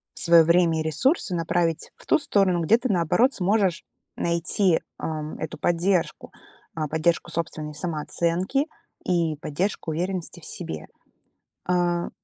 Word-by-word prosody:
своё 170 -1 +6
время 170 0 +3
и - - -1
ресурсы 180 - +1
направить 165 -1 -1
в - - -18
ту - - +3
сторону, 195 - +2
где 215 +8 +5
ты, 255 +1 -3
наоборот, 180 - +3
сможешь 195 -2 +1 0.3
найти, 170 +1 +1 0.2
ам, 155 -1 -4
эту 160 - -5
поддержку, 175 +1 0 0.4
а, 155 -2 -2
поддержку 160 +3 0
собственной 155 -2 -4
самооценки 170 - -1 0.4
и 170 -3 +1
поддержку 160 +4 -2
уверенности 180 +2 -3
в - - -10
себе, 80 -1 -6 0.8
а 175 -1 +1
170 Hz, 130 wpm, -25 LUFS, 160-185 Hz, 0.8 s, своё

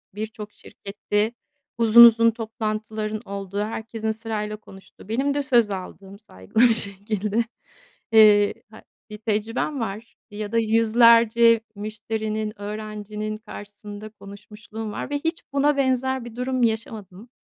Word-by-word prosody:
birçok 215 0 -7
şirkette 205 +2 -4 0.4
uzun 235 +1 +8
uzun 230 0 +5
toplantıların 215 -1 -4
olduğu, 200 0 -6
herkesin 220 +1 -4
sırayla 215 -1 -5
konuştuğu, 195 -1 -17
benim 270 +5 0
de 285 0 -1
söz 240 -6 +3
aldığım 195 +1 -8
saygılı 150 - -2
bir 235 -2 +5
şekilde, 210 +1 +2 0.7
eee, 210 -2 +6 0.2
hay 220 - -14 0.3
bir 210 - -8
tecrübem 220 +6 -2
var 220 0 -6 0.2
ya 205 0 -6
da 230 - 0
100'lerce 230 +1 +4
müşterinin, 215 0 -5
öğrencinin 215 0 -6
karşısında 205 -1 -10
konuşmuşluğum 210 +1 -10
var - - -6
ve 290 0 -2
hiç 325 +2 -3
buna 285 +1 +2
benzer 260 -1 0
bir 235 -1 -10
durum 255 0 -2
yaşamadım. 220 -2 -4
215 Hz, 125 wpm, -23 LUFS, 210-230 Hz, 0.7 s, uzun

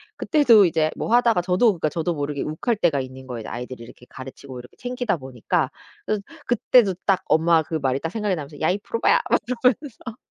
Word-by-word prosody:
그때도 245 - +5
이제 160 -2 +1
뭐 225 - -2
하다가 235 -6 +4
저도 180 +5 +1
그러니까 160 -3 -1
저도 165 +3 -2
모르게 145 -2 -3
욱할 210 +10 -2
때가 160 -8 +1
있는 130 0 -10
거예요 120 -4 -6
아이들을 125 0 -7
이렇게 125 +1 -15
가르치고 130 0 -10
이렇게 125 - -14
챙기다 245 -5 -2
보니까. 130 -5 -2 0.4
그래서 210 -2 -1 0.2
그때도 235 -3 +3
딱 195 -2 +2
엄마 165 0 +3
그 155 - -10
말이 135 -3 0
딱 165 - -3
생각이 210 -1 -1
나면서 145 -1 -8
"야 155 - +2
이 185 - +1
브로바야." 230 +3 +1
막 - - +3 0.2
이러면서. 250 -2 -1
165 Hz, 460 characters per minute, -23 LUFS, 135-215 Hz, 0.4 s, 그때도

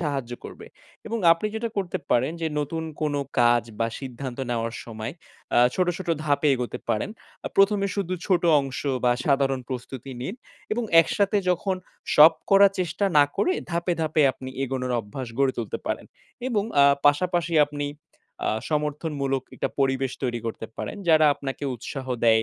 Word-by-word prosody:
সাহায্য 140 -7 -2
করবে - - -9 0.4
এবং 230 +1 -2
আপনি 165 +6 -2
যেটা 230 +1 -2
করতে 190 -4 -1
পারেন 130 +6 +2
যে, 165 - 0
নতুন 160 +3 -3 0.2
কোনো 145 -2 0 0.2
কাজ 120 -1 +5 0.2
বা 115 - +3
সিদ্ধান্ত 130 -1 -6
নেওয়ার 115 -1 -2
সময় 110 +1 -6 0.4
আ - - +7 0.2
ছোট, 185 -1 +2
ছোট 185 -2 -7 0.2
ধাপে 145 0 +2
এগোতে 125 -1 -4
পারেন। 105 - 0 0.4
আ - - -1
১ম 195 +1 +5
এ - - -3
শুধু 185 -2 -1
ছোট 185 -3 +2 0.2
অংশ 135 -1 -5 0.2
বা 120 - +5
সাধারণ 135 -2 +2
প্রস্তুতি 130 +1 -6
নিন 160 - -4 0.4
এবং 235 +1 0 0.2
একসাথে 200 +5 +1
যখন 185 +2 0 0.4
সব 155 +2 +10 0.2
করার 195 0 +7
চেষ্টা 175 +3 -1
না 145 - +8
করে 365 - +2 0.2
ধাপে, 170 +1 0
ধাপে 155 -1 +2
আপনি 130 0 -9 0.2
এগোনোর 125 -1 -2
অভ্যাস 115 +4 -7
গড়ে 135 -1 +3
তুলতে 115 - -3
পারেন - - -2 0.4
এবং 210 -5 0 0.2
আ - - +7 0.2
পাশাপাশি 170 +2 +2
আপনি 145 0 -4 0.6
আ - - +2 0.2
সমর্থনমূলক 150 -3 -1
একটা - - -2
পরিবেশ 135 -1 +1
তৈরি 120 -2 -1
করতে 110 0 -5
পারেন। - - -5
যারা 155 -1 +6
আপনাকে 135 +1 -5
উৎসাহ 130 +3 -7 0.2
দেয়, 110 -1 +5
145 Hz, 165 wpm, -25 LUFS, 130-175 Hz, 0.6 s, সব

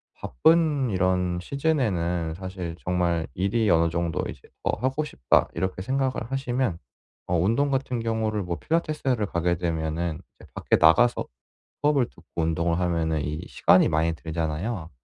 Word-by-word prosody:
바쁜 150 - +2
이런 90 -2 +1
시즌에는 90 - 0
사실 90 -1 -6
정말 85 -2 0
'일이 105 +4 +1
어느 85 0 +4
정도 85 -1 -1
이제 - - -9 0.2
더 - - +2
하고 135 +4 0
싶다.' 65 - +2
이렇게 95 +2 -2
생각을 130 0 -1
하시면 130 -7 -1 0.5
어 90 0 +1
운동 115 +12 +2
같은 130 -3 -1
경우를 110 -2 -1
뭐 85 -1 -3
필라테스를 150 - -1
가게 85 -1 0
되면은 80 -1 -2 0.2
이제 - - -15
밖에 - - +2
나가서 120 +10 +4 0.6
수업을 145 -4 +3
듣고 85 - -20 0.2
운동을 85 +1 0
하면은 85 -3 0
이 75 +2 -4
시간이 - - +4
많이 80 +2 +1
들잖아요. 80 +4 -3
90 Hz, 325 characters per minute, -25 LUFS, 85-125 Hz, 0.6 s, 어느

